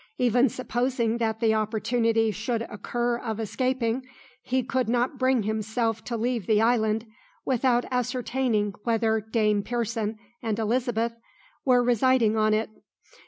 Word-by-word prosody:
Even 245 +1 +3
supposing 240 -1 -1
that 220 -1 -1
the 225 -1 +3
opportunity 225 +1 +1
should 225 +3 -2
occur 240 +3 -2
of 225 -3 -4
escaping, 255 +2 -1 0.4
he 260 0 0
could 255 -1 -1
not 245 +3 0
bring 255 -3 +2
himself 220 +1 -1
to 235 +1 -3
leave 235 -3 -1
the 215 -2 +4
island 225 -1 +2 0.4
without 250 -1 +2
ascertaining 250 -4 0
whether 225 -1 +1
Dame 210 -1 +1
Pearson 225 -1 -2 0.2
and 220 -3 -2
Elizabeth 230 0 0 0.5
were 250 -2 +4
residing 240 -2 +3
on 215 0 +3
it. 215 +1 0
230 Hz, 130 wpm, -26 LUFS, 220-245 Hz, 0.5 s, the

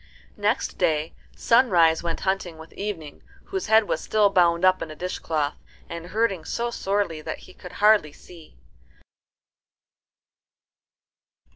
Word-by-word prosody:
Next - - -1
day 155 0 +1 0.2
Sunrise 180 -10 +4
went 170 -1 -3
hunting 190 -3 -2
with 160 +1 -13
Evening, 180 -8 -6 0.2
whose 385 -5 -4
head 220 0 +5
was - - -1
still 210 -2 +2
bound 175 -1 +3
up 185 0 +4
in 160 - -4
a 155 - -8
dishcloth, 155 -4 -2 0.3
and 170 0 -7
hurting 200 -4 0
so 235 +7 -3
sorely 195 -7 -1
that - - -5
he - - -15
could 180 - -12
hardly 210 -7 +4
see. 165 +2 -16
180 Hz, 130 wpm, -24 LUFS, 160-210 Hz, 0.3 s, head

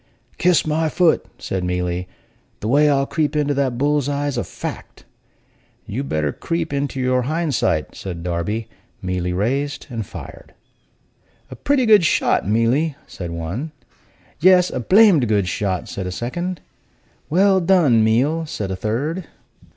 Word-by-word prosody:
"Kiss 180 -1 +3
my 155 +1 0
foot!" 175 0 +2
said 95 -1 -3
Mealy. 90 0 -2 0.5
"The 105 - -3
way 145 +5 +4
I'll 135 -1 +2
creep 150 0 -1
into 145 -1 +1
that 135 -3 0
bull's 145 +1 +1
eye's 145 -1 -1
a 120 - -1
fact." - - -8 0.8
"You'd 135 +7 -4
better 75 -2 0
creep 165 -2 -3
into 140 -1 -2
your 130 0 +1
hind 155 +3 -1
sight," 85 -9 0
said 85 -3 -7
Darby. 90 +6 -2 0.4
Mealy 90 -1 -2
raised 135 +10 -1
and 115 -2 -3
fired. - - -11 1.0
"A - - -7
pretty 275 -3 +1
good 210 -4 +6
shot, 155 - +2
Mealy!" 120 +8 +1
said 85 -2 -7
one. 90 - -5 0.7
"Yes, 180 +2 +5
a - - -3
blamed 185 - +5
good 100 -3 +1
shot!" 95 0 -2
said 95 -2 -5
a - - -4
second. 175 - -4 0.7
"Well 190 +3 +4
done, 165 -11 +4
Meal!" 140 +9 +1
said 100 -10 -4
a - - -2
third. 140 - -2
135 Hz, 150 wpm, -20 LUFS, 100-160 Hz, 1.0 s, good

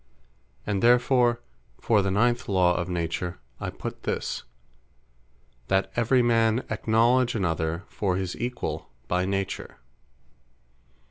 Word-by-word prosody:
And 100 -2 -1
therefore 120 0 +4 0.4
for 110 -3 +3
the 100 - 0
ninth 120 +5 +1
Law 90 -3 +4
of 90 +1 -2
Nature, 85 0 -2 0.2
I - - -3
put - - -7
this, - - -2 1.3
"That 95 +6 +1
every 120 +2 +3
man 115 0 +2
acknowledge 120 +2 +2
other 85 -3 -1
for 95 -3 -1
his 95 -1 -2
Equall 120 -11 -4 0.2
by 90 +1 +1
Nature." 100 -1 -3
105 Hz, 115 wpm, -26 LUFS, 90-120 Hz, 1.3 s, therefore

